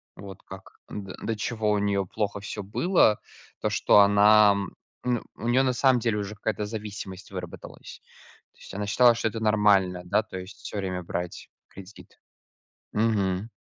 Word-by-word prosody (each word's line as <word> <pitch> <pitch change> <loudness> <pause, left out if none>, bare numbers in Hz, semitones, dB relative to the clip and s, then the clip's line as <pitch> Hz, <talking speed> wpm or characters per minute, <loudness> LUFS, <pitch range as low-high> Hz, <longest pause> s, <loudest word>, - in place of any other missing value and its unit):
Вот 100 -1 -11
как, 95 0 -12
до 95 -2 -7
до 115 - -2
чего 110 0 -2
у 105 - +2
неё 100 -1 0
плохо 105 +2 -3
всё 100 0 -6
было. 110 - +2 0.4
То, - - 0
что - - +4
она, 105 +1 +6 0.5
ну, 125 -2 0
у 115 - -6
неё 125 +2 +3
на 130 -1 +1
самом 130 0 +3
деле 115 -2 0
уже 105 0 -4
какая-то 105 -1 -3
зависимость 105 -3 -7
выработалась. - - -9 0.5
То - - -31
есть - - -12
она 105 +1 -3
считала, 120 +3 +5
что 115 - -1
это 115 - -6
нормально, 105 -4 +3
да, 105 +5 +1
то 105 -3 -8
есть, 95 +2 -9
всё - - -6
время 95 -2 -3
брать 85 0 -5 0.2
кредит. 100 +1 -14 0.7
Мгм. 105 -2 0
105 Hz, 165 wpm, -26 LUFS, 95-110 Hz, 0.7 s, она